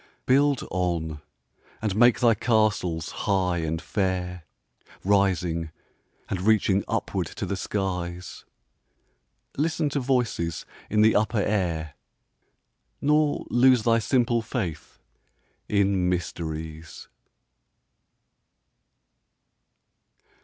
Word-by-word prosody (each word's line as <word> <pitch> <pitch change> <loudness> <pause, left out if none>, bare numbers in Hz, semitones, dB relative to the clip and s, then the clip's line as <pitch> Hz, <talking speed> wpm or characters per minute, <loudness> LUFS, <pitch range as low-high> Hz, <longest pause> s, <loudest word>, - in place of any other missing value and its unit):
Build 140 +1 +3
on, 85 -4 -2 0.6
and 105 -3 -2
make 120 +3 +5
thy 120 -2 +5
castles 105 -8 0 0.2
high 90 -3 +1
and 80 0 -2
fair, 90 -3 -2 0.6
Rising 90 -5 +1 0.6
and 90 - -3
reaching 100 -1 +3
upward - - -2
to - - -5
the 100 - -2
skies; 90 -3 -4 1.1
Listen 155 +1 0
to 140 - -1
voices 125 - -1 0.2
in 105 0 +2
the 110 - +5
upper 110 0 +2
air, 85 -7 -1 1.1
Nor 150 0 +2
lose 125 -1 +5
thy 115 0 +3
simple 120 0 +1
faith 110 - -5 0.7
in 100 -3 +2
mysteries. 80 -2 -5
100 Hz, 90 wpm, -25 LUFS, 85-115 Hz, 1.1 s, make